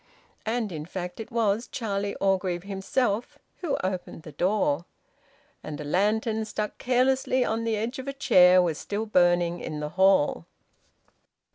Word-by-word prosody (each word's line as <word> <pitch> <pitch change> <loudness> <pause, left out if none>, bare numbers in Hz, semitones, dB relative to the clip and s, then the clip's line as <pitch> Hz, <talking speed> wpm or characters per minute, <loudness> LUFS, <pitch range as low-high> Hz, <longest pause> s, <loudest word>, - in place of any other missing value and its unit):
And 225 -2 -1
in 155 -2 -5
fact 180 0 -6
it 225 - -7
was 225 0 +1
Charlie 200 -3 -2
Orgreave 185 -2 0
himself 200 +3 -1 0.2
who 325 -6 -2
opened 185 -3 -4
the 155 - -10
door. 170 -2 0 0.8
And 155 -1 -7
a - - -4
lantern, 215 +7 +1
stuck 210 0 -4
carelessly 255 0 +2
on 225 +1 -1
the 225 -1 0
edge 230 +5 -3
of 260 - -7
a 275 - -2
chair, 185 -9 +6
was 165 -4 -1
still 205 +2 -3
burning 175 -3 +2
in 155 -2 -5
the 150 0 -3
hall. 190 - +3
200 Hz, 150 wpm, -26 LUFS, 175-225 Hz, 0.8 s, chair